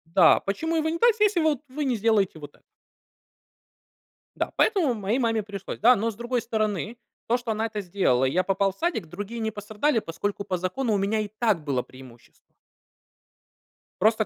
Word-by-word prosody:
Да. 175 Hz, -4 st, +7 dB
Почему 320 Hz, +12 st, -2 dB
его 315 Hz, 0 st, +1 dB
не 330 Hz, +1 st, -2 dB
так, 475 Hz, -1 st, +5 dB
если, 420 Hz, -3 st, +3 dB
вот, 310 Hz, -4 st, +2 dB
вы 290 Hz, +3 st, -3 dB
не 255 Hz, -, +1 dB
сделаете 210 Hz, -6 st, +1 dB
вот 145 Hz, -1 st, -11 dB
это? -, -, -28 dB, 1.7 s
Да. -, -, -2 dB
Поэтому 365 Hz, -, +3 dB
моей 215 Hz, +3 st, -1 dB
маме 225 Hz, -3 st, +1 dB
пришлось, 200 Hz, -2 st, -7 dB
да. 245 Hz, +4 st, +6 dB
Но, 225 Hz, +2 st, -1 dB
с -, -, -14 dB
другой 240 Hz, +2 st, -2 dB
стороны, 215 Hz, 0 st, -2 dB, 0.3 s
то, 240 Hz, +2 st, +3 dB
что 240 Hz, -2 st, -4 dB
она 220 Hz, +1 st, -1 dB
это 215 Hz, -2 st, -4 dB
сделала, 175 Hz, -9 st, +1 dB
и 130 Hz, -, +1 dB
я 185 Hz, +4 st, +2 dB
попал 195 Hz, 0 st, +1 dB
в -, -, -28 dB
садик, 340 Hz, -, -1 dB
другие 205 Hz, +7 st, -6 dB
не 220 Hz, -1 st, -1 dB
пострадали, 215 Hz, +5 st, 0 dB
поскольку 200 Hz, +3 st, -4 dB
по 190 Hz, -2 st, -2 dB
закону 215 Hz, +7 st, -1 dB
у -, -, +2 dB
меня 200 Hz, +3 st, 0 dB
и 210 Hz, -, -2 dB
так 215 Hz, -5 st, 0 dB
было 135 Hz, -4 st, 0 dB
преимущество. 130 Hz, -2 st, -17 dB, 1.5 s
Просто 220 Hz, +2 st, +3 dB
215 Hz, 190 wpm, -25 LUFS, 195-240 Hz, 1.7 s, Да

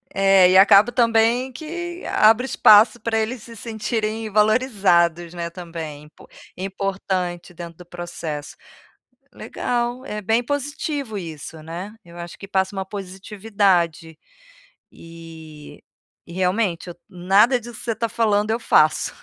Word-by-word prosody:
É, 195 Hz, -2 st, +5 dB
e 185 Hz, -, +5 dB
acabo 200 Hz, +4 st, +6 dB
também 235 Hz, +2 st, +2 dB
que 345 Hz, +5 st, -7 dB
abre 225 Hz, +4 st, +4 dB
espaço 215 Hz, -2 st, +5 dB
para 225 Hz, 0 st, -1 dB
eles 220 Hz, +2 st, -2 dB
se 230 Hz, -, -12 dB
sentirem 220 Hz, 0 st, -4 dB
valorizados, 200 Hz, -7 st, +2 dB
né, 170 Hz, -1 st, -5 dB
também, 165 Hz, -4 st, -8 dB
impo 150 Hz, -, -18 dB, 0.3 s
importante 190 Hz, -2 st, -4 dB
dentro 170 Hz, -1 st, -10 dB
do 180 Hz, -, -12 dB
processo. 170 Hz, -4 st, -7 dB, 0.8 s
Legal, 245 Hz, +2 st, -3 dB
é 210 Hz, -3 st, -5 dB
bem 225 Hz, +4 st, +1 dB
positivo 285 Hz, -3 st, -4 dB
isso 160 Hz, -2 st, -9 dB
né, 175 Hz, +6 st, -8 dB
eu 170 Hz, 0 st, -15 dB
acho 170 Hz, 0 st, -9 dB
que 195 Hz, -, -10 dB
passa 190 Hz, 0 st, -1 dB
uma 190 Hz, -1 st, -4 dB
positividade. 190 Hz, -4 st, -2 dB, 0.7 s
E 160 Hz, -2 st, -13 dB, 0.5 s
e 170 Hz, -, -11 dB
realmente 185 Hz, -1 st, -1 dB
eu, 175 Hz, -, -9 dB
nada 195 Hz, +8 st, +3 dB
disso 240 Hz, -1 st, -10 dB
que -, -, -7 dB
você 235 Hz, -, -1 dB
está 230 Hz, +2 st, -2 dB
falando 210 Hz, -1 st, +1 dB
eu 225 Hz, -, -1 dB
faço, -, -, +2 dB
195 Hz, 135 wpm, -21 LUFS, 175-225 Hz, 0.8 s, acabo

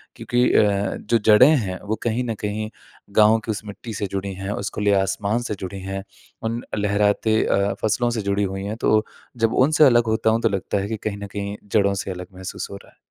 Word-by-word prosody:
क्योंकि 120 Hz, 0 st, 0 dB
अ, 100 Hz, -1 st, +2 dB
जो 115 Hz, +2 st, +1 dB
जड़ें 110 Hz, +5 st, +8 dB
हैं 95 Hz, -5 st, -3 dB
वो 110 Hz, -, 0 dB
कहीं 120 Hz, +2 st, 0 dB
न 115 Hz, -2 st, -2 dB
कहीं 105 Hz, +1 st, -3 dB, 0.5 s
गाँव 110 Hz, +1 st, +6 dB
की 110 Hz, -, -1 dB
उस 105 Hz, -, -4 dB
मिट्टी 105 Hz, +2 st, -8 dB
से 100 Hz, 0 st, -3 dB
जुड़ी 100 Hz, 0 st, -3 dB
हैं, 95 Hz, +1 st, -6 dB
उस 100 Hz, +2 st, -3 dB
खुले 105 Hz, -1 st, +2 dB
आसमान 100 Hz, +3 st, +1 dB
से 105 Hz, -, -3 dB
जुड़ी 95 Hz, +1 st, -6 dB
हैं, 95 Hz, 0 st, -5 dB, 0.4 s
उन 115 Hz, +2 st, -2 dB, 0.2 s
लहराते 105 Hz, +2 st, +2 dB
अ, 100 Hz, +1 st, +1 dB
फसलों 120 Hz, +3 st, +1 dB
से 115 Hz, -2 st, -2 dB
जुड़ी 100 Hz, 0 st, 0 dB
हुई 95 Hz, 0 st, -3 dB
हैं। 105 Hz, +2 st, -3 dB
तो 110 Hz, 0 st, +3 dB, 0.3 s
जब 115 Hz, -1 st, +1 dB
उनसे 150 Hz, +3 st, +4 dB
अलग 120 Hz, -3 st, +5 dB
होता 110 Hz, 0 st, +2 dB
हूँ 115 Hz, +1 st, +1 dB
तो 115 Hz, -, +3 dB
लगता 100 Hz, +1 st, -2 dB
है 100 Hz, -, -3 dB
कि 110 Hz, -, -2 dB
कहीं 100 Hz, -1 st, -3 dB
न -, -, -5 dB
कहीं 100 Hz, 0 st, -4 dB, 0.2 s
जड़ों 100 Hz, -2 st, +3 dB
से 95 Hz, -, -5 dB
अलग 90 Hz, 0 st, -7 dB
महसूस 95 Hz, 0 st, -6 dB
हो -, -, -6 dB
रहा -, -, -18 dB
है। -, -, -32 dB
105 Hz, 230 wpm, -22 LUFS, 100-110 Hz, 0.5 s, जड़ें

